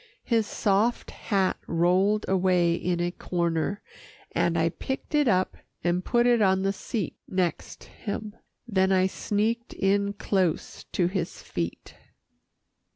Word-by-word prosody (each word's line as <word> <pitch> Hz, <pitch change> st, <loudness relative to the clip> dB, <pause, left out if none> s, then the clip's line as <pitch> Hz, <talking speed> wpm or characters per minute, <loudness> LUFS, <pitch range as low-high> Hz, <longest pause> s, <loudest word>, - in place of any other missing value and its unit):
His 225 Hz, -3 st, +1 dB
soft 210 Hz, +4 st, +1 dB
hat 195 Hz, -4 st, 0 dB
rolled 185 Hz, +5 st, +2 dB
away 180 Hz, -2 st, +3 dB
in 175 Hz, 0 st, -1 dB
a 175 Hz, 0 st, 0 dB
corner, 170 Hz, +2 st, -1 dB, 0.5 s
and 170 Hz, -1 st, +1 dB
I 165 Hz, 0 st, +3 dB
picked 265 Hz, -, -5 dB
it 295 Hz, -2 st, +3 dB
up 185 Hz, -4 st, +2 dB, 0.3 s
and 175 Hz, +1 st, +1 dB
put 240 Hz, +3 st, +2 dB
it 240 Hz, -2 st, +4 dB
on 190 Hz, -1 st, +3 dB
the 195 Hz, 0 st, +1 dB
seat 200 Hz, -2 st, -4 dB
next 185 Hz, -2 st, -2 dB
him. 210 Hz, +1 st, -6 dB, 0.3 s
Then 190 Hz, -3 st, +2 dB
I 185 Hz, -1 st, +4 dB
sneaked 215 Hz, +4 st, -1 dB
in 200 Hz, +1 st, +1 dB
close 190 Hz, -5 st, -1 dB
to 180 Hz, -, +2 dB
his 180 Hz, -1 st, -3 dB
feet. 85 Hz, -1 st, -5 dB
190 Hz, 135 wpm, -27 LUFS, 175-210 Hz, 0.5 s, it